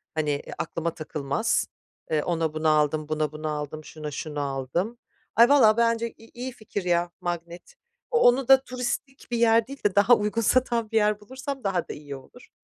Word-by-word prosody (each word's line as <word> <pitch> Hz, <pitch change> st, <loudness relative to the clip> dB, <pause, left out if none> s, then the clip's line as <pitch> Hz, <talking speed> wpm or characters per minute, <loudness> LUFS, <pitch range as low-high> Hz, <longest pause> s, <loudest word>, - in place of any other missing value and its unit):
hani, 155 Hz, -1 st, 0 dB
eee, 145 Hz, -, -4 dB
aklıma 165 Hz, 0 st, -3 dB
takılmaz. 155 Hz, +7 st, -1 dB, 0.4 s
Eee, 155 Hz, -2 st, +1 dB
ona 165 Hz, -3 st, -1 dB
bunu 155 Hz, 0 st, -1 dB
aldım, 155 Hz, 0 st, +1 dB
buna 155 Hz, -1 st, 0 dB
bunu 155 Hz, 0 st, -5 dB
aldım, 150 Hz, +1 st, -4 dB
şuna 150 Hz, -1 st, -7 dB
şunu 150 Hz, 0 st, -5 dB
aldım. 140 Hz, -, -2 dB, 0.4 s
Ay, 235 Hz, +2 st, +7 dB
valla 230 Hz, -7 st, +6 dB
bence 230 Hz, 0 st, +1 dB
i 225 Hz, -, -16 dB
iyi 250 Hz, +2 st, -5 dB
fikir, 215 Hz, -5 st, -6 dB
ya, 175 Hz, -1 st, +1 dB
magnet. 175 Hz, -, -5 dB, 0.4 s
O 470 Hz, -, +3 dB
onu 250 Hz, -, +4 dB
da 270 Hz, 0 st, +7 dB
turistik 255 Hz, +2 st, -4 dB
bir 240 Hz, -, 0 dB
yer 230 Hz, -1 st, +4 dB
değil 275 Hz, +1 st, -10 dB
de 205 Hz, -, +2 dB
daha 205 Hz, +4 st, +6 dB
uygun 210 Hz, +2 st, -1 dB
satan 235 Hz, -1 st, +1 dB
bir 225 Hz, -, +2 dB
yer 210 Hz, -1 st, +2 dB
bulursam 265 Hz, +5 st, -7 dB
daha 190 Hz, -4 st, -1 dB
da -, -, -5 dB
iyi 145 Hz, -1 st, -8 dB
olur. 135 Hz, -, -15 dB
200 Hz, 190 wpm, -26 LUFS, 155-235 Hz, 0.4 s, Ay